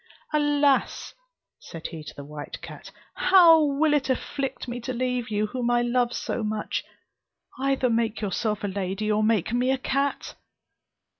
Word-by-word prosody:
"Alas!" 290 -2 +2 0.5
said 165 -1 -10
he 160 -2 -8
to - - -10
the 140 - -8
white 150 0 -8
cat, - - -9 0.2
"how 345 -4 +6
will 295 +1 +2
it 285 -2 +1
afflict 270 +1 -3
me 245 0 -4
to 240 - -4
leave 250 -1 -2
you 210 0 0
whom 240 +2 -2
I 240 0 +3
love 240 0 +1
so 235 - -3
much! 215 0 -2 0.8
Either 270 -1 +1
make 230 -1 0
yourself 210 +1 -2
a - - 0
lady, 195 +2 -2
or 210 0 +2
make 215 -1 +1
me 250 +1 +1
a 265 - +2
cat." 275 +2 -2
240 Hz, 160 wpm, -25 LUFS, 210-275 Hz, 0.8 s, how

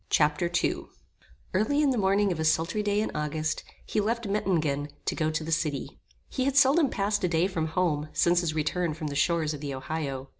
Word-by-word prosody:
Chapter 150 +3 +2
II - - -1 0.7
Early 215 +10 +2
in 290 -2 +3
the 250 - 0
morning 195 0 +2
of 170 - -3
a - - 0
sultry 165 +6 +1
day 205 0 +1
in 220 - -2
August, 155 +1 -2 0.2
he 210 - 0
left 230 +2 -1
Mettingen, 160 -8 0 0.2
to - - 0
go 155 -1 0
to 155 0 -2
the 160 - -5
city. 155 -3 -2 0.3
He 260 - -2
had 275 0 +1
seldom 280 +2 +5
passed 205 0 -1
a - - +3
day 170 0 +2
from 165 -4 -1
home 155 -3 0
since 175 0 +3
his 160 -3 -2
return 160 +1 0
from 155 -1 -4
the 140 - -5
shores 155 +1 +1
of 145 - -7
the 140 -2 -4
Ohio. 135 -1 -4
165 Hz, 215 wpm, -27 LUFS, 155-205 Hz, 0.7 s, seldom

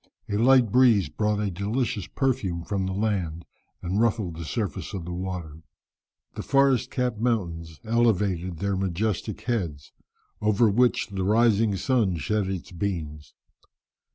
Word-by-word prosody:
A 100 - -2
light 120 0 +5
breeze 120 -6 +4
brought 105 -1 0
a 105 -2 -1
delicious 105 +2 -2
perfume 110 -11 -1
from 95 0 -2
the - - -2
land, 95 -5 -2 0.4
and 95 +4 0
ruffled 105 -7 0
the 85 0 -6
surface 100 - -3
of 90 -4 -5
the 90 - -5
water. 90 -4 -5 0.7
The - - -5
forest 135 -3 +3
capped 125 -4 -1
mountains 85 -9 -2
elevated 100 -7 +1
their 100 +3 -1
majestic 95 +2 -2
heads, 85 - -3 0.5
over 105 +1 +3
which 120 +1 +2
the 95 -2 -3
rising 110 0 +3
sun 105 -5 +1
shed 105 +4 -1
his 95 -2 -5
beams. 80 -5 -4
100 Hz, 140 wpm, -26 LUFS, 90-115 Hz, 0.7 s, light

